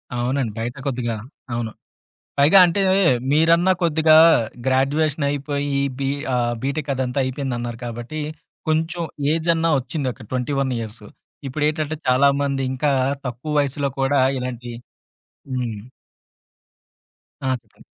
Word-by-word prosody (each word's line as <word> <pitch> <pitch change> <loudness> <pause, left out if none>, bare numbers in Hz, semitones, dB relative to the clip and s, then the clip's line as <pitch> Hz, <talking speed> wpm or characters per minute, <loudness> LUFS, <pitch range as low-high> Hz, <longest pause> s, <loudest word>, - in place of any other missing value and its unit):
అవునండి. 125 0 -1
బయట 120 +2 -3
కొద్దిగా 120 -3 -1 0.4
అవును. 120 -2 -2 0.7
పైగా 150 +8 +7
అంటే 185 +3 0 0.5
మీరన్న 165 +4 +4
కొద్దిగా 160 -1 +4 0.5
గ్రాడ్యుయేషన్ 140 +3 +1
అయిపోయి 140 0 -1 0.2
బి 135 -1 -1 0.3
ఆహ్, 120 -1 +1
బిటెక్ 140 +2 -2
అదంతా 130 +1 -2
అయిపోయింది 130 -1 -3
అన్నారు 120 -1 -5
కాబట్టి 120 +6 -5 0.5
కొంచెం 165 +2 0 0.3
ఏజ్ 165 +1 -1
అన్న 165 0 0
ఒచ్చింది 130 +1 -3
అక్కడ 115 -3 -14
21 130 +1 0
ఇయర్స్. 110 -1 -7 0.4
ఇప్పుడేంటంటే 155 +2 -1
చాలా 130 +2 +4 0.2
మంది 140 -1 -1
ఇంకా 145 +3 0 0.4
తక్కువ 125 +5 -4
వయస్సులో 140 0 0
కూడా 135 0 +3 0.2
ఇలాంటి 125 -1 -5 0.8
హ్మ్. 120 -4 -2 1.7
ఆ! - - +1
చెప్పండి. 110 - -23
135 Hz, 115 wpm, -22 LUFS, 125-150 Hz, 1.7 s, పైగా